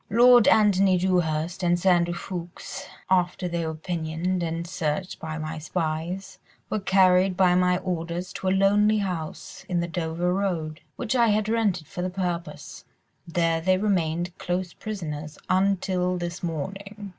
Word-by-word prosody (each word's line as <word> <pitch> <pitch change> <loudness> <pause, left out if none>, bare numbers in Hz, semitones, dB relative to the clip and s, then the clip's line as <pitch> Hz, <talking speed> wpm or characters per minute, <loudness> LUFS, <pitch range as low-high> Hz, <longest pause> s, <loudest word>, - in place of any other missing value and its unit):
"Lord 240 +2 +6
Antony 195 -3 +5
Dewhurst 175 -1 0
and 175 -1 +2
Sir 185 +1 +4
Andrew 175 -1 +2
Ffoulkes, 175 -1 -7 0.2
after 180 0 +2
they 170 -1 -2
were 160 - -3
pinioned 170 +2 -2
and 165 0 -2
searched 175 0 -3
by 160 -1 -5
my 155 0 -4
spies, 165 +3 -3 0.3
were 215 - 0
carried 190 -1 +4
by 185 -2 +5
my 180 0 +3
orders 175 -1 -4
to 190 - -4
a - - +4
lonely 205 +3 +4
house 180 -6 -4
on 175 -2 +1
the 170 - -1
Dover 170 0 -1
Road, 175 -5 -2
which 245 +1 -2
I 235 -2 +4
had 215 0 +2
rented 210 -7 +1
for 180 - -6
the 185 - -1
purpose: 180 -2 -4 0.4
there 165 -1 +1
they 185 +2 +3
remained 175 -3 0
close 180 0 -2
prisoners 155 -8 -6
until 185 -1 +1
this 175 0 -5
morning. 195 +5 -5
180 Hz, 155 wpm, -25 LUFS, 170-195 Hz, 0.4 s, Lord